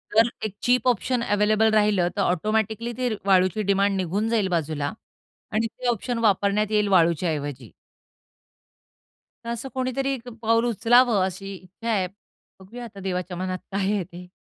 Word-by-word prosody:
जर 225 +2 +6 0.2
एक 210 - -4
chip 250 +1 +2
option 245 +1 +1
available 215 +1 +2
राहिलं 210 -4 +3
तर 200 - +2
ऑटोमॅटिकली 220 +6 0
ती 250 -1 0 0.2
वाळूची 185 +1 +3
डिमांड 200 0 +2
निघून 190 +5 -1
जाईल 220 -4 +1
बाजूला 155 -4 -1 0.6
आणि 220 +2 +1
ते 245 +2 -6
ऑप्शन 240 +1 -1
वापरण्यात 205 0 +2
येईल 210 -1 +2
वाळूच्याऐवजी 155 - +1 1.7
तर - - -4
असं 235 +3 -4
कोणीतरी 260 +1 -1
एक 250 -2 -7
पाऊल 230 +1 +2
उचलावं 235 -2 +4
अशी 195 +1 -6
इच्छा 190 +5 -8
आहे. 190 -4 +1 0.5
बघूया 230 +6 -10
आता 200 -3 -11
देवाच्या 180 -1 -3
मनात 185 0 -3
काय 195 - -1
आहे 200 -3 0
ते. 175 +2 -12
205 Hz, 150 wpm, -24 LUFS, 185-230 Hz, 1.7 s, जर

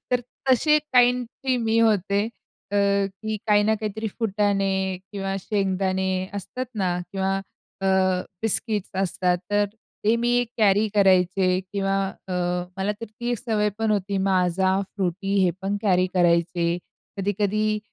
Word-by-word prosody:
तर 250 -1 +2 0.3
तशी 300 +4 +4
काइंडची 250 +1 +2
मी 225 -1 +1
होते. 205 -2 +2 0.5
अ, - - +1 0.5
की 220 0 -2
काही 205 -1 +4
ना 220 +1 +3
काहीतरी 220 +1 -3
फुटाणे 195 -3 0 0.2
किंवा 195 -1 -3
शेंगदाणे 190 -1 0
असतात 225 +6 -5
ना 190 -3 0 0.2
किंवा 195 0 0 0.4
अ, - - +1 0.6
बिस्किट्स 215 -2 0
असतात 180 -1 0
तर 205 0 +3 0.4
ते 220 +2 +4
मी 240 +1 +2
कॅरी 210 0 +4
करायचे 185 -1 +3
किंवा 195 -1 0 0.3
अ, - - -3 0.4
मला 195 +2 0
तर - - -3
ती 240 +3 -5
एक 240 - -1
सवय 215 -4 0
पण 225 -1 +1
होती, 200 -1 0
माझा, 190 0 +2 0.2
फ्रुटी 195 +1 -1
हे 180 - +3
पण 195 +1 -1
कॅरी 185 -3 +3
करायचे. 170 -1 +2 0.4
कधी-कधी 205 +2 0
200 Hz, 135 wpm, -24 LUFS, 190-220 Hz, 0.6 s, तशी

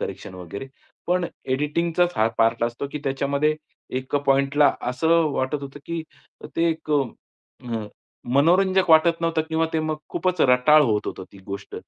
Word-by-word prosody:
Correction - - -6
वगैरे. 95 +8 -8 0.4
पण 180 0 +1 0.2
एडिटिंगचाच 165 +6 0
हा 110 +1 +3
पार्ट 115 +1 +2
असतो, 120 +4 -3
की 150 - -3
त्याच्यामध्ये 140 +3 0 0.4
एक 130 +2 -7
पॉइंटला 140 +2 +4 0.2
असं 125 +6 -1 0.2
वाटत 140 +2 -2
होतं, 140 +1 -8
की 170 -1 -3 0.5
ते 165 0 +3
एक 160 -1 -6
अ, 120 -4 -4 0.5
मनोरंजक 185 +5 +3
वाटत 165 +1 +5
नव्हतं 165 -1 +1
किंवा 160 0 +1
ते 160 - +1
मग 155 0 -2
खूपच 180 -2 -1
रटाळ 130 +4 +5
होत 105 -5 0
होतं 95 - -5
ती 100 - -14
गोष्ट. 100 0 -7
145 Hz, 150 wpm, -23 LUFS, 125-165 Hz, 0.5 s, वाटत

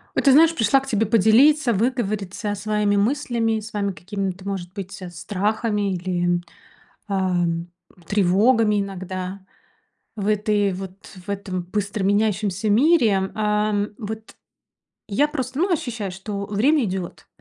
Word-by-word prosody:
Вот - - +1
ты 275 - +7
знаешь, 325 +4 +6
пришла 230 +2 +3
к 270 - -11
тебе 220 0 +1
поделиться, 235 +6 +4
выговориться 210 -3 -1
своими 210 0 0
мыслями, 230 0 +1
своими 210 -2 -3
какими-то, 190 +1 -5
может 185 -3 -4
быть, 195 -1 -7
страхами 205 +4 -1
или, 175 -1 0 0.7
а, 190 -3 0 0.6
тревогами 210 +3 +3
иногда 190 0 -5 0.8
в 200 -2 -3
этой 210 -1 +1
вот 190 +1 -8 0.2
в - - -25
этом 195 -2 -3
быстро 200 +2 -3
меняющемся 205 0 +1
мире 220 - +3
ам. 210 -1 0
Вот 220 -1 -7 0.7
я 215 +9 +2
просто 265 -3 -4
ну 365 +3 +2
ощущаю, 240 - -2
что 200 +1 -5
время 245 +8 +2
идёт. 185 -3 -5
205 Hz, 125 wpm, -22 LUFS, 195-225 Hz, 0.8 s, ты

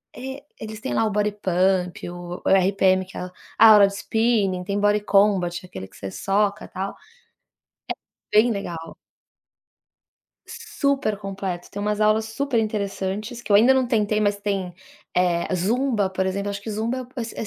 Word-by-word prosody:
é 265 +2 -7 0.2
eles 215 0 -7
têm 120 - -3
lá - - +2
o 215 - 0
Bodypump, 190 -4 0
o 175 0 -7
RPM 190 0 +3
que 185 - -15
é - - -4
a 180 - -5 0.3
aula 215 -2 +9
de 195 - -6
spinning, 210 -5 +1
tem 200 +2 -2
Body 205 0 +3
Combat, 195 -3 +2
aquele 95 - -8
que - - -21
você 95 - -6
soca 205 - 0
tal, 190 +1 -5 1.4
é - - +7
bem 245 - 0
legal. 170 -5 -6 1.5
Super 280 -7 -1
completo, 195 -3 -5
tem 205 - -5
umas 210 0 -1
aulas 215 +1 +3
super 240 +2 -1
interessantes 210 +2 -3
que 210 -2 -5
eu - - +7
ainda 235 +6 +6
não 260 -2 +2
tentei, 215 -3 +1
mas 205 -1 +1
tem, 195 -3 -3 0.4
eh, 175 -1 +2
zumba, 220 +2 +1
por 190 0 -1
exemplo, 200 +2 -2
acho 200 - -6
que 220 - -7
zumba 235 +4 -2
essas 235 -2 -4
205 Hz, 160 wpm, -23 LUFS, 190-220 Hz, 1.5 s, aula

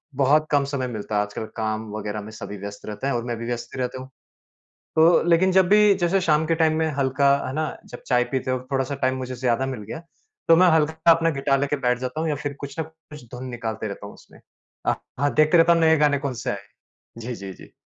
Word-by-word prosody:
बहुत 145 +3 +3
कम 145 -2 +3
समय 135 -2 -3
मिलता 110 -3 -5
है। 105 - +3
आजकल 105 +2 -5
काम 110 0 -3
वग़ैरह 105 0 -4
में 105 +1 -9
सभी 105 -1 -8
व्यस्त 100 +1 -8
रहते 105 +5 -4
हैं 140 - 0
और 120 -1 -1
मैं 120 -1 -2
भी 115 - -6
व्यस्त 120 0 -5
ही - - -6
रहता 125 +1 -3
हूँ। 130 - -11 0.9
तो 165 +2 +6
लेकिन 180 +2 +4
जब 190 -1 +4
भी 210 0 +6
जैसे 180 +3 +2
शाम 155 -3 +2
के 165 - +2
टाइम 160 -1 +2
में 160 - +1
हल्का 140 +1 +2 0.2
है - - -4
ना 155 +1 0 0.3
जब - - -9
चाय 125 -2 +3
पीते 130 -1 -1
हो 130 - 0
थोड़ा-सा 135 +1 0
टाइम 130 0 +1
मुझे 130 0 -5
ज़्यादा 125 +1 0
मिल 130 -5 -5
गया 115 +10 -7 0.5
तो 165 - +7
मैं 185 +2 +6
हल्का 160 +1 +3
अपना 165 0 +2
गिटार 135 0 +1
लेके 145 +1 0
बैठ 125 0 +2
जाता 130 +4 -4
हूँ 160 - -1
या 150 - 0
फिर 145 -1 -3
कुछ 140 +2 -8
न - - +1
कुछ 160 -3 -14
धुन 125 +1 -6
निकालते 110 -2 -4
रहता 100 0 -7
हूँ 100 - -11
उसमे। - - -18 0.5
अ, - - +3 0.3
हाँ 145 0 +2
देखते 155 +3 +4
रहता 165 +1 +6
हूँ 170 - +3
नए 160 0 +5
गाने 145 -2 +3
कौन 140 -2 -3
से - - 0
आए - - -2 0.4
हैं, 115 - -17
जी, 120 +2 -5
जी, 100 -3 -8
जी। - - -15
135 Hz, 250 wpm, -23 LUFS, 120-160 Hz, 0.9 s, तो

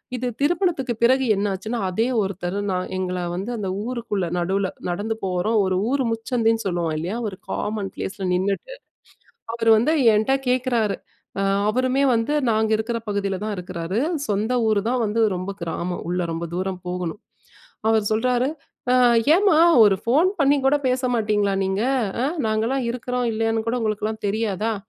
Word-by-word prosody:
இது 250 0 -2
திருமணத்துக்கு 315 -5 +1
பிறகு 260 +2 +4
என்னாச்சுன்னா, 205 +4 -2
அதே 220 +6 0 0.2
ஒருத்தர் 190 -1 -3
நான் 185 0 -2
எங்கள 180 -1 -2 0.2
வந்து 195 +6 -4
அந்த 200 -3 -3 0.2
ஊருக்குள்ள 230 -6 -2
நடுவில 190 +2 0 0.2
நடந்து 205 +5 -2
போறோம். 185 +4 0
ஒரு 185 0 0 0.2
ஊர் 275 -1 +1
முச்சந்தின்னு 225 -1 0
சொல்லுவோம் 170 -3 -1
இல்லயா! 180 +9 -3
ஒரு 200 - -5
காமன் 205 -2 -2
ப்ளேஸ்ல 190 0 -4
நின்னுட்டு, 195 - -1 0.8
அவரு 225 -1 +1
வந்து 270 +9 +2 0.2
என்ட்ட 220 +5 +2
கேட்குறாரு. 245 -5 +1 0.4
அ 195 - +1 0.3
அவருமே 255 +4 +1
வந்து 230 +5 0 0.2
நாங்க 220 0 +1
இருக்கிற 230 +2 -2
பகுதியில 200 -2 -1
தான் 215 -1 -2
இருக்கிறாரு. 180 +2 -3 0.3
சொந்த 210 +3 0
ஊரு 210 -2 +2
தான், 250 0 +1
வந்து 215 +2 0
ரொம்ப 185 +2 -4
கிராமம், 170 +1 -3
உள்ள 180 +1 -1
ரொம்ப 165 +1 -3
தூரம் 185 0 -3
போகணும். 180 +3 -4 0.7
அவர் 220 -2 +2
சொல்றாரு 250 +4 +1 0.4
''அ - - +5 0.4
ஏன்ம்மா! 375 -4 +4 0.2
ஒரு 205 -2 +5
ஃபோன் 285 +10 +3
பண்ணிகூட 280 -1 +3
பேச 255 +1 0
மாட்டிங்களா 210 -3 +1
நீங்க? 190 +2 -1 0.4
அ - - +2 0.2
நாங்கலாம் 225 +5 0
இருக்கிறோம் 250 0 -2
இல்லையான்னு 225 0 0
கூட 240 - 0
உங்களுக்கெல்லாம் 215 0 -2
தெரியாதா?'' 215 +1 -1
215 Hz, 150 wpm, -23 LUFS, 190-245 Hz, 0.8 s, அ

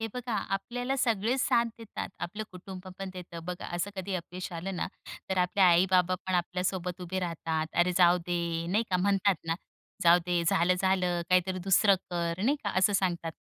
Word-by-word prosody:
हे 225 - -1
बघा 250 -1 -4 0.2
आपल्याला 245 +6 -2
सगळेच 235 0 +1
साथ 235 -1 +3
देतात. 225 -2 -6
आपलं 180 +5 -4
कुटुंब 185 +1 -9
पण 195 -1 -5
देतं 170 -2 -9
बघा 180 0 -5
असं 175 +4 -2
कधी 190 +1 -3
अपयश 180 +1 -5
आलं 180 +3 -4
ना, - - -1 0.4
तर 190 - +1
आपले 180 +2 +1
आई-बाबा 185 0 +5
पण 185 - 0
आपल्यासोबत 180 0 -1
उभे 180 +1 -3
राहतात. 165 -2 -2
"अरे, 175 +1 +2
जाऊ 180 -1 +6
दे, 170 -1 -1
नाही 215 +5 +2
का? 180 - +3
म्हणतात 195 +1 +2
ना, 165 - +1 0.5
जाऊ 170 +1 +7
दे 175 -1 +1
झालं, 175 +2 +3
झालं, 185 -2 +1
काहीतरी 185 0 +2
दुसरं 195 +2 +4 0.2
कर." 170 +1 -2
नाही 280 +6 +3
का 205 - 0
असं 195 +2 +4
सांगतात 175 -4 0
185 Hz, 185 wpm, -29 LUFS, 175-195 Hz, 0.5 s, जाऊ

